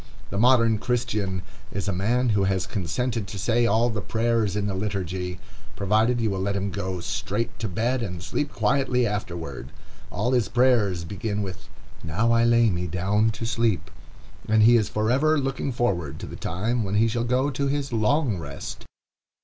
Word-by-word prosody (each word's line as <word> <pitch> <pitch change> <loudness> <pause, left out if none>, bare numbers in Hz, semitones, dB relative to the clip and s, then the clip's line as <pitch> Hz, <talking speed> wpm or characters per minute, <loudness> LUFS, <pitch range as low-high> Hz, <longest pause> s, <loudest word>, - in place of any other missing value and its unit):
The 100 - -1
modern 115 -2 +4
Christian 105 -7 -1 0.3
is 100 -4 -3
a 100 - 0
man 120 +7 +1
who 100 -3 +2
has 95 -1 0
consented 105 +4 -2
to 100 - -7
say 120 +4 +2
all 115 +3 +3
the 105 -1 -3
prayers 115 -2 0
in 105 -1 0
the 100 - -1
liturgy, 95 -2 -3 0.4
provided 110 +5 +2
you 110 -3 +1
will 95 - -2
let 100 +1 -1
him 100 0 -1
go 95 -2 -3
straight 95 +8 -3
to 115 - -2
bed 120 +7 0
and 90 -6 -4
sleep 145 +9 -2
quietly 125 +2 +1
afterward. 85 - -4 0.4
All 125 - -1
his 120 -5 +2
prayers 120 -8 +3
begin 100 +4 -3
with 95 -2 -8 0.3
"Now 105 +9 +1
I 115 0 +4
lay 120 -2 +4
me 90 0 -2
down 100 +6 +1
to 110 +1 -4
sleep," 115 -3 0 0.6
and 110 0 +5
he 120 +2 +7
is 110 -4 +2
forever 130 +9 +2
looking 135 0 -1
forward 85 - -1
to - - -4
the - - -8
time 110 +7 -1
when 100 0 -2
he 110 +2 +4
shall 115 +1 -1
go 130 +4 +1
to 140 +1 -1
his 140 -2 -2
"long 115 - +1
rest." 70 -3 -7
110 Hz, 180 wpm, -25 LUFS, 95-120 Hz, 0.6 s, he